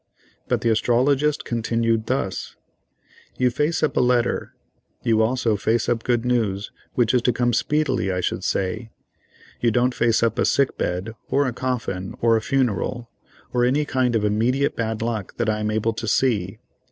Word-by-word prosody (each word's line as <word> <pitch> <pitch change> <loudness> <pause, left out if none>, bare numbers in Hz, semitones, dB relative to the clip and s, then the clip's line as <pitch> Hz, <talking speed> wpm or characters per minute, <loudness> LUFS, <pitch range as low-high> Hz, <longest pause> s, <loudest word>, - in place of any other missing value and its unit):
But - - 0
the 115 - +2
astrologist 135 +6 +2
continued 115 -1 0
thus: 130 -7 -2 0.8
"You 125 -1 +2
face 150 +6 0
up 155 - +1
a - - +3
letter; 125 -1 +1 0.5
you 110 -1 +3
also 115 -1 +1
face 110 +3 0
up 115 -1 0
good 120 -1 0
news 110 -5 0 0.2
which 120 -1 +2
is 125 - +3
to 125 - +2
come 120 +1 0
speedily 145 -10 +1
I 90 - -1
should - - -2
say; 110 +5 -2 0.7
you 120 - +2
don't 125 +2 +2
face 115 -2 +2
up 115 +1 +1
a - - +3
sick 140 -1 +2
bed, 90 +5 -3 0.2
or 140 +1 +2
a 125 - -1
coffin, 115 -7 -3
or 115 -1 +4
a 110 - +1
funeral, 120 -1 -1 0.4
or 120 -1 +2
any 140 +5 +2
kind 130 -4 0
of 105 -2 +1
immediate 120 +7 +1
bad 110 -1 -2
luck 110 -5 -4
that 115 -2 +1
I 105 - -2
am 105 0 -1
able 110 +1 0
to 115 0 -5
see. 105 -4 +1
115 Hz, 175 wpm, -23 LUFS, 110-125 Hz, 0.8 s, or